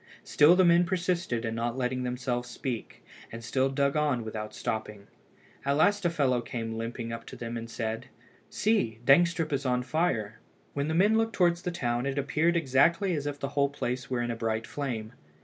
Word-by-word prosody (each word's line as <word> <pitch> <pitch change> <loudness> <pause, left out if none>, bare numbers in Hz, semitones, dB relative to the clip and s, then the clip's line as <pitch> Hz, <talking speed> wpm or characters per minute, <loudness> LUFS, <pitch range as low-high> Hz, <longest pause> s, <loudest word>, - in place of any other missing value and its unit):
Still 150 +4 +5
the 185 0 +5
men 170 0 +6
persisted 175 -9 -1
in 115 - -2
not 115 +2 -2
letting 125 0 -1
themselves 125 0 -2
speak, 120 -1 -5 0.3
and 115 +1 -8
still 130 +4 +1
dug 140 +1 +1
on 145 -6 +1
without 110 -1 -5
stopping. 105 -2 -4 0.6
At 140 +1 +1
last 205 +4 +3
a - - +4
fellow 135 -7 +1
came 115 -1 -4
limping 115 +1 -4
up 115 0 -6
to - - -8
them 115 0 -5
and 115 0 -5
said 115 -1 -4 0.4
"See, 205 - +1
Dangstrup 165 +3 +4
is 140 0 0
on 125 -2 +1
fire!" 125 -7 -1 0.3
When 140 +1 -1
the 160 - -1
men 210 +5 +4
looked 225 0 0
towards 175 -1 +2
the 180 - -2
town, 120 -6 -1
it 140 0 -2
appeared 155 +5 +1
exactly 170 +6 +3
as 145 -3 -2
if 145 -1 -4
the 140 - -3
whole 140 0 +1
place 130 -2 -4
were 125 -2 0
in 120 - -2
a - - -3
bright 115 0 -2
flame. 120 -6 -4
130 Hz, 200 wpm, -28 LUFS, 115-165 Hz, 0.6 s, men